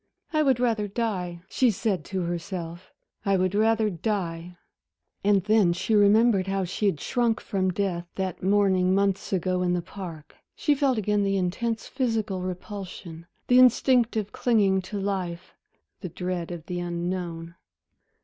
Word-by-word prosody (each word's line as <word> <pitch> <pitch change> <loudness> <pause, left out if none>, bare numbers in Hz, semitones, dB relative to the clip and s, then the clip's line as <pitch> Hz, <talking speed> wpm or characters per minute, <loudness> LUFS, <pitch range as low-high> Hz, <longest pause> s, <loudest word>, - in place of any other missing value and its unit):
"I 310 - +3
would 265 -5 +3
rather 225 -4 +1
die," 190 -6 -3
she 255 +4 +2
said 210 -2 -1
to 190 -2 -3
herself, 175 0 -5 0.3
"I 195 -1 +2
would 185 0 0
rather 220 0 +2
die." 175 -2 -3 0.7
And 200 -2 +3
then 210 -4 +4
she 190 +5 -2
remembered 205 -1 +4
how 195 0 0
she 185 +4 -1
had 160 -7 0
shrunk 235 +3 0
from 190 -3 -1
death 180 -2 -2
that 190 -2 -3
morning 190 -1 +3
months 195 -1 0
ago 185 -1 0
in 180 -1 +1
the 175 - 0
park. 175 -5 -9 0.2
She 295 - +2
felt 275 -3 +1
again 210 0 +1
the 195 0 +1
intense 220 +5 -2
physical 220 -7 -1
repulsion, 180 -2 -7 0.2
the 250 0 +5
instinctive 240 -4 +4
clinging 200 -6 +2
to 205 - -3
life, 185 -3 -3 0.5
the 185 - -6
dread 180 0 -4
of 170 -3 -7
the 180 -1 -4
unknown.... 175 -1 -4
195 Hz, 150 wpm, -26 LUFS, 180-215 Hz, 0.7 s, the